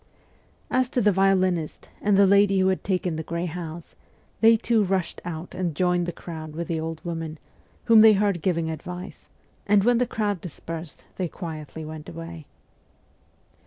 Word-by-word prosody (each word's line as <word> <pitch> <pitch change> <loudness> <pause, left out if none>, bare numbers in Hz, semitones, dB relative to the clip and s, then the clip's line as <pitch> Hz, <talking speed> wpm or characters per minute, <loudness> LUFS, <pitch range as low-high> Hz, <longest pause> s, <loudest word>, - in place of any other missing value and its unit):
As 255 -1 +2
to 255 - 0
the 210 -3 +4
violinist 185 -4 +1
and 205 -1 +3
the 200 - +7
lady 200 0 +4
who 190 0 +3
had 190 - -1
taken 180 -4 -1
the - - -2
grey 170 +2 -3
house, 170 -1 -7 0.4
they 225 0 +6
too 225 -1 +2
rushed 190 -2 -1
out 170 0 -6
and 180 -4 -2
joined 180 +1 +1
the - - -1
crowd 160 -2 -8
with 170 0 -4
the 165 -1 -1
old 160 +1 -5
woman, 165 -2 -4 0.5
whom 225 -2 +7
they 220 0 +8
heard 200 -4 +1
giving 170 -2 0
advice, 180 +4 -8 0.4
and 200 -1 +4
when 240 +1 +4
the 250 - +1
crowd 205 -5 -1
dispersed 165 -1 -8
they 185 - -1
quietly 160 -2 -7
went 155 -1 -8
away. 165 -2 -9
180 Hz, 170 wpm, -25 LUFS, 165-200 Hz, 0.5 s, they